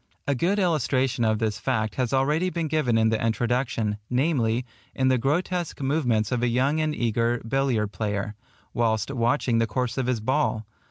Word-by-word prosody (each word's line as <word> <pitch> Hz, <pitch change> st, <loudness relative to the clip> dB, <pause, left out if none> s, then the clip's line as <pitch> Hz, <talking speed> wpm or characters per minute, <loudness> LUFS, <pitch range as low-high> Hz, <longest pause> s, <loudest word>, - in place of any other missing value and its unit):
A 140 Hz, -, +2 dB
good 175 Hz, +10 st, +1 dB
illustration 140 Hz, -, +1 dB
of 110 Hz, -1 st, +2 dB
this 110 Hz, -1 st, -1 dB
fact 110 Hz, -2 st, -1 dB
has 125 Hz, -3 st, -1 dB
already 150 Hz, +7 st, +2 dB
been 170 Hz, -3 st, -2 dB
given 145 Hz, -7 st, +1 dB
in 110 Hz, 0 st, +3 dB
the 110 Hz, 0 st, 0 dB
Introduction, 115 Hz, -2 st, 0 dB
namely, 125 Hz, -3 st, +1 dB, 0.3 s
in 130 Hz, 0 st, +2 dB
the 130 Hz, -1 st, +3 dB
grotesque 170 Hz, +6 st, -1 dB
movements 130 Hz, -7 st, 0 dB
of 125 Hz, -2 st, 0 dB
a 120 Hz, -, +2 dB
young 130 Hz, +6 st, +1 dB
and 155 Hz, -1 st, 0 dB
eager 115 Hz, +1 st, 0 dB
billiard 120 Hz, -5 st, 0 dB
player, 105 Hz, 0 st, -3 dB, 0.4 s
whilst 115 Hz, 0 st, 0 dB
watching 120 Hz, -1 st, +1 dB
the 115 Hz, -, +2 dB
course 125 Hz, +3 st, -2 dB
of 130 Hz, -, -1 dB
his 125 Hz, -3 st, 0 dB
ball. 115 Hz, -2 st, 0 dB
125 Hz, 175 wpm, -25 LUFS, 115-140 Hz, 0.4 s, in